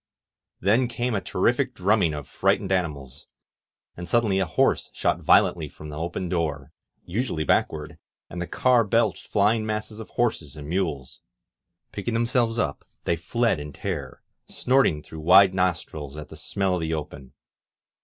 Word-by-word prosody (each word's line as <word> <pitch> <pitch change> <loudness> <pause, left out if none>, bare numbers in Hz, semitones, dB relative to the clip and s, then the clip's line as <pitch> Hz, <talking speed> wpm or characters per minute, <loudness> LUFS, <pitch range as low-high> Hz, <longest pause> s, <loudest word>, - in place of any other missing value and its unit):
Then 115 +7 +3
came 120 +1 -2
a 100 - 0
terrific 120 +8 0
drumming 95 -5 +2
of 75 -2 -7
frightened 95 - 0
animals, 75 -8 -3 0.7
and 85 0 -7
suddenly 110 -5 +2
a 95 - 0
horse 80 - +1
shot - - 0
violently - - +3
from 75 - -11
the 75 0 -6
open 85 +2 -3
door, 75 -5 -2 0.3
usually 100 -4 -2
backward, 75 -1 0 0.3
and 85 - -6
the 85 - -3
car 125 -2 +3
belched 115 +3 0
flying 105 +2 +2
masses 110 0 -4
of 110 - -9
horses 85 - -1
and 75 -1 -8
mules. 80 -7 -3 0.7
Picking 110 +3 -3
themselves 120 0 +1
up, 80 -11 -1 0.2
they 85 - +1
fled 115 +3 0
in 75 0 -7
terror, - - -5 0.2
snorting 125 - +2
through 80 - -10
wide 95 +4 +6
nostrils 80 -5 -2
at 75 -1 -8
the - - -10
smell 95 -2 -1
of 90 - -1
the 80 0 -1
open. 70 -3 -8
90 Hz, 155 wpm, -25 LUFS, 75-115 Hz, 0.7 s, wide